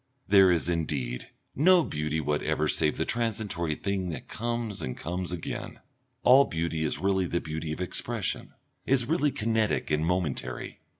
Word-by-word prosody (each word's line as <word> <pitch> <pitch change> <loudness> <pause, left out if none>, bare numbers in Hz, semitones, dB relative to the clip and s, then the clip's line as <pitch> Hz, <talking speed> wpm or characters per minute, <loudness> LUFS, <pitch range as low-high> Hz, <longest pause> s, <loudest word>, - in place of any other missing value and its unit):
There 95 -2 +7
is, 85 -1 +1
indeed, 75 -8 -2 0.3
no 175 +4 +6
beauty 75 - -2
whatever 75 -1 0
save 75 -1 +1
that 80 - -1
transitory 105 -9 -1
thing 95 0 -2
that 80 - -6
comes 115 -3 -3
and 65 - -4
comes 90 +3 -3
again; 90 -3 -5 0.4
all 135 +3 +7
beauty 80 -3 -2
is 75 - +1
really 95 +2 +1
the 85 - 0
beauty 80 0 -4
of 80 - -4
expression, 90 - -2 0.3
is 130 -2 +2
really 150 +1 +2
kinetic 110 - 0
and 75 +1 +2
momentary. 85 -4 -2
90 Hz, 155 wpm, -28 LUFS, 80-110 Hz, 0.4 s, There